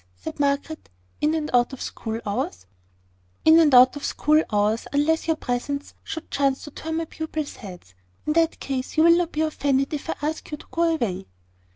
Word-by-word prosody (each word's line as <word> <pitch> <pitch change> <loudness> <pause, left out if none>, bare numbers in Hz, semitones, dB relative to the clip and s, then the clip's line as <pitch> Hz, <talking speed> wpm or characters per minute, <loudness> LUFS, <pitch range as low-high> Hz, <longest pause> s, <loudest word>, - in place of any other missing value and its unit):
said 90 - -8
Margaret. 285 +2 -1 0.3
"In 305 +2 +2
and 305 -1 -2
out 245 +2 +3
of 265 - -7
school 225 0 -5
hours?" 95 - -3 0.8
"In 320 +1 +8
and 315 -3 +5
out 255 +2 +7
of 290 - -7
school 305 +1 +2
hours, 210 +2 +1
unless 305 +4 +1
your 320 - +2
presence 280 +2 -3
should 320 0 -7
chance 275 -1 +1
to 295 - -9
turn 320 +3 -5
my 330 0 -1
pupils' 315 -2 -5
heads. 180 - -11 0.3
In 300 - +1
that 330 0 +2
case, 265 +2 -4
you 315 - +6
will 335 0 +7
not 345 -1 0
be 305 - -1
offended 285 -3 0
if 300 +1 -5
I - - -1
ask 310 +2 -3
you 300 - -5
to - - -15
go 335 0 +2
away." 195 - -3
290 Hz, 200 wpm, -24 LUFS, 250-315 Hz, 0.8 s, In